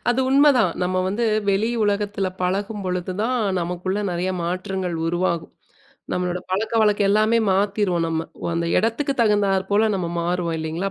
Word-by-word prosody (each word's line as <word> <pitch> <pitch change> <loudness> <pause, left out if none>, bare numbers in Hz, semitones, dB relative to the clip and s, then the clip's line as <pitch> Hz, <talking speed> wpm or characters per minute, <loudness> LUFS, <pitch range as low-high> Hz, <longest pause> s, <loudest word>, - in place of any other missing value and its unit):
அது 245 +2 +2
உண்ம 280 +2 +5
தான். 215 -8 +3
நம்ப 185 +1 0
வந்து 210 +5 -1 0.2
வெளி 200 +3 +2
உலகத்துல 205 -1 0
பழகும் 200 +3 -2
பொழுது 180 0 -2
தான், 250 +3 0 0.2
நமக்குள்ள 180 +3 -2
நெறைய 175 +2 -1
மாற்றங்கள் 185 0 -3
உருவாகும். 170 -1 -1 0.6
நம்முடைய 180 0 -1
பழக்கவழக்கம் 210 0 +2
எல்லாமே 215 +3 +3
மாத்திருவோம் 195 -3 +1
நம்ப. 160 0 -1 0.2
ஓ! - - -6
அந்த 170 0 -1
இடத்திற்கு 245 +5 0
தகுந்தாறு 200 -3 +2
போல 215 +2 +3
நாம் 180 -3 -2
மாறுவோம் 170 -1 -1
இல்லிங்களா? 160 +5 -3
190 Hz, 150 wpm, -22 LUFS, 180-210 Hz, 0.6 s, உண்ம